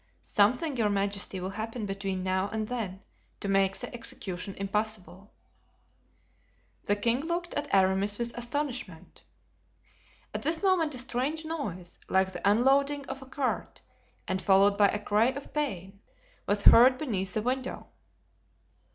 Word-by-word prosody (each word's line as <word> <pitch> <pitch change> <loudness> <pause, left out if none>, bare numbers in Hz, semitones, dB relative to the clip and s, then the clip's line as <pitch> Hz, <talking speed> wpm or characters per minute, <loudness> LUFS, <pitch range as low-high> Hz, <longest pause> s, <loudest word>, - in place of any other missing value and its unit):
"Something, 250 +8 +2
your 220 -3 +2
majesty, 200 -1 -1
will 185 +1 -4
happen 220 +2 -4
between 195 -1 -3
now 190 +1 0
and 220 0 -3
then 210 -6 -4 0.4
to - - -4
make 195 -1 +2
the - - -6
execution 195 -5 -5
impossible." 205 -1 -4 1.5
The 205 - +2
king 230 +4 +1
looked 345 +3 -3
at 290 0 -3
Aramis 195 +2 +3
with 235 0 -3
astonishment. 245 - -3 1.1
At - - -3
this 320 +4 -1
moment 340 -7 +2
a - - -6
strange 260 +6 -2
noise, 200 - -5
like 190 0 +2
the 180 +3 +1
unloading 275 +6 +3
of 270 0 -7
a 265 - -11
cart, 275 -2 -3 0.4
and 185 0 -1
followed 195 +2 +5
by 205 0 +5
a 210 - -1
cry 210 +2 +2
of 275 +2 -5
pain, 195 - -3 0.5
was 205 0 +1
heard 255 +2 +8
beneath 195 -10 -3
the 215 - 0
window. 255 +2 -2
215 Hz, 145 wpm, -29 LUFS, 195-265 Hz, 1.5 s, heard